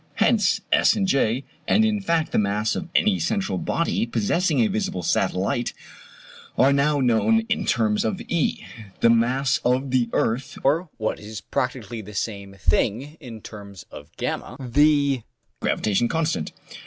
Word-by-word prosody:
Hence, 210 -5 +2
S - - +4
and 200 - 0
J, 130 -5 +1 0.2
and 220 +1 +4
in 215 -2 0
fact 165 -4 0
the - - +2
mass 105 +1 0
of 180 - -5
any 205 -3 +3
central 200 -3 -1
body 165 -7 -1
possessing 140 - +1
a 110 - +4
visible 95 -5 -2
satellite, 100 +8 0 0.8
are 135 +2 +5
now 145 +1 +2
known 130 - +3
in 225 - 0
terms 110 -2 +1
of 110 - -2
E, 170 -4 -1 0.4
the 115 - +6
mass 125 +3 +2
of 130 +2 0
the 125 -3 +2
earth 120 +4 -1
(or, 160 +6 +1
what 110 -1 -2
is 105 0 -8
practically 120 -3 -3
the 105 0 -11
same 100 -1 -4
thing, 110 - 0
in 115 -3 -10
terms 100 -3 -11
of - - -11
V, - - -3 0.3
the 140 +1 +2 0.4
gravitation 110 +3 +1
constant). 160 - -1
125 Hz, 155 wpm, -23 LUFS, 110-155 Hz, 0.8 s, the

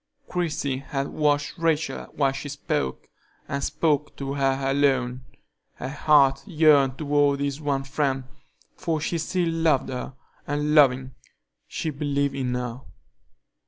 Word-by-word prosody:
Christie 150 -6 -1
had 135 0 -3
watched 145 0 0
Rachel 165 -2 0
while 140 -2 +2
she 135 +2 -6
spoke, 70 - -3 0.4
and 140 0 -3
spoke 150 -2 0
to 135 0 -4
her 135 -1 +1
alone; 130 -3 +1 0.5
her 130 - -5
heart 140 -2 +4
yearned 150 -6 +4
toward 145 -2 +2
this 140 +1 -2
one 140 -2 0
friend, 135 -1 -1 0.5
for 165 -4 -1
she 165 +2 -2
still 175 +2 0
loved 165 -4 +1
her, 130 0 -5 0.3
and, 150 +1 0
loving, 130 -3 +4 0.5
she 160 - -3
believed 140 -1 -1
in 130 -2 -2
her. 125 0 -4
140 Hz, 130 wpm, -25 LUFS, 135-150 Hz, 0.5 s, heart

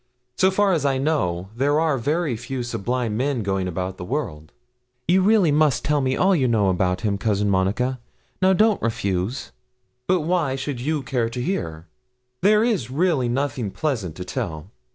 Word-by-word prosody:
So 190 - +4
far 195 0 +2
as 160 -5 0
I 135 -2 +1
know, 100 - -1
there 145 +4 +2
are 155 -5 +1
very 150 +1 0
few 125 +3 -5
sublime 120 -1 -2
men 130 0 0
going 95 -1 -1
about 90 +1 -4
the - - -6
world.' 90 - -4 0.6
'You 185 +3 +4
really 200 -4 +4
must 150 -3 +2
tell 150 0 +2
me 130 0 0
all 190 +1 +4
you 135 -6 +2
know 110 -5 +2
about 90 +1 0
him, 100 -3 -1
Cousin 105 0 +1
Monica. 115 +8 0 0.4
Now 190 0 +5
don't 215 +2 +3
refuse.' 100 +1 -2 0.6
'But 185 -1 +2
why 160 -4 0
should 135 -2 -4
you 150 +1 -1
care 125 -3 -1
to 120 +2 -6
hear? 85 - -3 0.6
There 210 +3 +4
is 210 - 0
really 145 -3 +1
nothing 130 -3 -1
pleasant 100 - -3
to 90 - -7
tell.' 90 - -5
130 Hz, 175 wpm, -23 LUFS, 100-155 Hz, 0.6 s, Now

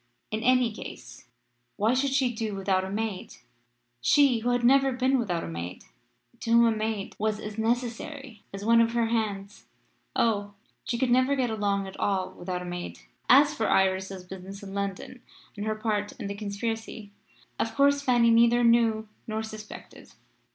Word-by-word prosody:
In 215 +1 -2
any 250 -1 +3
case, - - -10 0.5
why 220 +4 +2
should 270 +2 +1
she 265 -2 +1
do 220 -2 -3
without 190 -1 0
a 190 - -5
maid 210 -1 -4 0.7
she 255 - +4
who 240 +2 -1
had 245 0 +1
never 270 +2 +5
been 260 +1 +1
without 180 -8 -2
a - - -5
maid 85 +2 -6 0.6
to 235 - -6
whom 235 0 +6
a 225 -1 +2
maid 215 -2 -3
was 215 0 0
as 210 +1 -7
necessary 240 +1 -3
as 195 +1 -7
one 230 +1 +5
of 230 0 +1
her 235 -1 +2
hands? 205 -3 -3 0.5
Oh! 205 -3 0 0.3
she 235 - -2
could 245 0 +1
never 255 +3 +3
get 250 -4 0
along 200 -2 0
at 190 - -10
all 190 -2 0
without 180 0 -5
a - - -7
maid. 175 0 -6 0.3
As 290 +3 +7
for 225 -7 -1
Iris's 190 0 +1
business 190 +2 -9
in 195 -1 -8
London 200 +5 -4 0.3
and 205 +1 -4
her 215 - 0
part 215 -2 -2
in - - -8
the 200 - -3
conspiracy, 210 +1 -5 0.5
of 225 - -2
course 280 0 +4
Fanny 240 -4 +4
neither 235 +1 +5
knew 230 -2 +3 0.2
nor 220 0 -2
suspected. 215 -1 -10
220 Hz, 175 wpm, -27 LUFS, 200-240 Hz, 0.7 s, As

